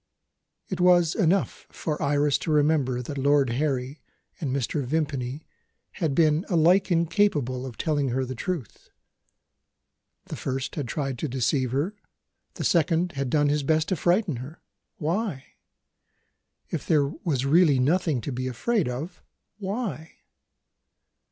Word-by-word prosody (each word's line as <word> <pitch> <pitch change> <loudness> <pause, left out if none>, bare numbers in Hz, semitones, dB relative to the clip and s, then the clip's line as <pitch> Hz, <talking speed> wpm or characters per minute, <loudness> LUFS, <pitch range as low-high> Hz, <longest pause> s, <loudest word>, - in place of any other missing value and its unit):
It 185 - -4
was 175 -2 +5
enough 190 -1 0
for 150 -2 -4
Iris 145 -1 +2
to 160 - -3
remember 145 -5 +2
that 140 +3 -5
Lord 140 -2 +3
Harry 135 +1 -2 0.4
and 150 -6 -2
Mr. 140 +2 -1
Vimpany 140 -1 -2 0.5
had 155 -6 -2
been 155 0 +3
alike 180 +3 +4
incapable 165 - +1
of 120 - -9
telling 145 -3 0
her 130 +2 -1
the 130 - -5
truth. 145 - -5 1.4
The - - -6
first 135 0 -3
had 145 -5 -3
tried 135 -1 -3
to - - -2
deceive 130 0 0
her; 145 +10 -1 0.6
the - - -4
second 170 +1 +2
had 140 -4 -3
done 145 +1 +2
his 150 +1 +1
best 155 +2 +1
to 185 - +1
frighten 175 - +1
her. 135 +7 -10 0.3
Why? 170 -3 -2 1.3
If - - -4
there 150 -3 +4
was 140 -2 -2
really 155 -1 +5
nothing 150 0 +1
to 140 - -4
be 130 +1 -3
afraid 170 - 0
of 155 +9 -6 0.4
why? 195 -5 -4
150 Hz, 140 wpm, -26 LUFS, 135-170 Hz, 1.4 s, was